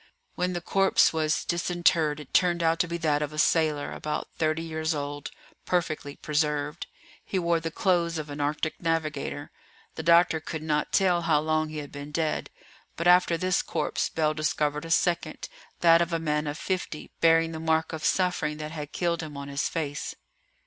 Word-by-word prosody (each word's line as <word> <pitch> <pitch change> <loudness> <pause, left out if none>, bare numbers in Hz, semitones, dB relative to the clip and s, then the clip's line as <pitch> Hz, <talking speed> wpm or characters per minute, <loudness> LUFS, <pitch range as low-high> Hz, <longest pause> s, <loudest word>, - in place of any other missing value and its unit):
When 180 0 -1
the 175 - -3
corpse 195 0 +3
was 155 -1 0
disinterred 170 -3 +1
it 150 - -12
turned 175 -2 +3
out 165 +1 +2
to 180 - +2
be 170 +1 -3
that 150 -3 +1
of 150 -1 -2
a - - -8
sailor, 155 -2 +2
about 150 - -4
thirty 155 0 0
years 160 0 -2
old, 145 0 -4 0.3
perfectly 155 -5 -1
preserved. 150 0 -1 0.4
He 195 - -3
wore 170 -2 +2
the 165 0 -3
clothes 170 -1 +1
of 155 -1 -4
an 145 0 -4
Arctic 150 +2 -2
navigator. 155 -3 -2 0.4
The - - -5
doctor 170 0 +5
could 155 0 -6
not 150 -1 0
tell 180 -3 +3
how 155 -3 +3
long 155 0 0
he 155 - -7
had 145 -1 -6
been 145 +1 -8
dead. 155 0 -1 0.5
But 170 - -3
after 180 -1 +5
this 185 +1 +1
corpse, - - -2
Bell 155 -1 +1
discovered 150 0 -1
a - - -7
second, 170 -1 0 0.3
that 165 0 +6
of 170 0 0
a 165 - +1
man 150 -2 -1
of 145 +1 -3
fifty, 180 -5 -4
bearing 165 0 +4
the 160 - -5
mark 160 0 0
of 160 - -4
the - - +1
suffering 180 -5 0
that 155 0 -6
had 150 -2 -7
killed 170 -1 0
him 150 -3 -7
on 140 0 -6
his 140 +1 -1
face. 145 -3 -3
160 Hz, 190 wpm, -27 LUFS, 150-170 Hz, 0.5 s, that